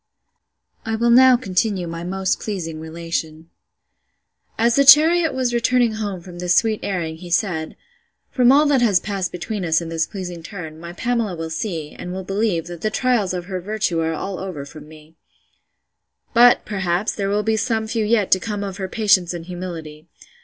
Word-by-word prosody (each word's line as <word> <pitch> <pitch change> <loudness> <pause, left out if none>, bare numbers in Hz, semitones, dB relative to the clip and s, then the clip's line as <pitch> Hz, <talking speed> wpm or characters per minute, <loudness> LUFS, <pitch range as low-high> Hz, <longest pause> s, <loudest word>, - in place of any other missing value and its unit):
—— - - -57
I 225 - 0
will 235 +1 +2
now 255 +1 +7
continue 195 -3 -1
my 165 0 -6
most 190 +1 -1
pleasing 165 -7 -5
relation. 160 0 -5 1.1
As 230 +1 +3
the 280 - +5
chariot 315 +4 +7
was 255 -2 -1
returning 240 0 +2
home 205 -4 -4
from 175 0 -11
this 180 0 +1
sweet 220 -2 +2
airing, 170 -5 -3
he 175 +1 -10
said, 170 -3 -1 0.6
From 250 -1 +4
all 290 +3 +5
that 285 -4 +3
has 205 -6 +4
passed 195 -2 -3
between 190 +3 -4
us 160 -2 +2
in 170 -1 -6
this 165 -1 -1
pleasing 180 -4 -7
turn, 160 -3 -8
my 170 +1 -8
Pamela 230 -2 -1
will 160 -1 -6
see, 160 -4 -4
and 180 - -8
will 190 +1 -5
believe, 195 -3 -1
that 175 -1 -9
the 215 - 0
trials 230 -3 +1
of 180 -1 -4
her 185 -1 -5
virtue 210 -3 -1
are 160 0 0
all 195 +4 -5
over 180 -7 -6
from 150 +1 -12
me: 155 +1 -16 1.2
But, 245 0 +6
perhaps, 190 -1 -1
there 195 -1 -2
will 205 +1 0
be 220 0 +1
some 220 0 -1
few 225 0 -1
yet 210 -2 +1
to 185 - +5
come 205 0 -4
of 195 -1 -5
her 190 -2 -4
patience 200 -6 +2
and 165 -1 -7
humility. 170 -4 -8
190 Hz, 190 wpm, -21 LUFS, 170-220 Hz, 1.2 s, now